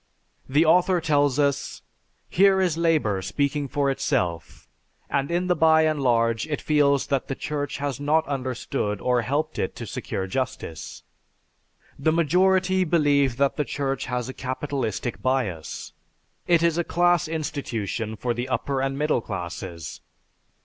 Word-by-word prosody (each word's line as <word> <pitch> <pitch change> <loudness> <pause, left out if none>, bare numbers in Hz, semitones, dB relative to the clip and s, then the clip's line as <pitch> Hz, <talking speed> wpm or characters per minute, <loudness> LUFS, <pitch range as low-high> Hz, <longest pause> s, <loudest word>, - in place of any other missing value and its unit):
The 150 +5 +4
author 180 +2 +4
tells 145 -4 +2
us, 140 -2 0 0.4
"Here 195 +1 +4
is 180 -4 +2
labor 155 - +1
speaking 140 +9 -1
for 140 0 0
itself, 85 - -2 0.4
and 140 0 0
in 175 +1 0
the 180 -1 +2
by 160 0 +5
and 155 -2 +1
large 115 -1 +2
it 150 -2 -2
feels 145 -2 +2
that 140 -2 -1
the 135 - -3
Church 145 -1 -3
has 140 -3 -3
not 155 +3 +2
understood 130 -5 -2
or 125 +1 +1
helped 145 +6 -2
it 95 - -2
to - - -6
secure 95 - -4
justice. 95 -6 -5 1.0
The 155 +3 +2
majority 185 +3 +3
believe 145 -7 +2
that 140 0 +1
the 150 - +1
Church 135 -2 -2
has 125 -1 -2
a 130 - -6
capitalistic 130 -3 -3
bias. 115 - -2 0.5
It 170 -1 +4
is 170 0 +2
a - - +2
class 175 0 +2
institution 115 - -3
for 120 +2 -2
the 120 +2 -4
upper 130 +2 -1
and 135 0 -1
middle 150 -4 +1
classes." 85 -4 -6
140 Hz, 150 wpm, -24 LUFS, 125-160 Hz, 1.0 s, by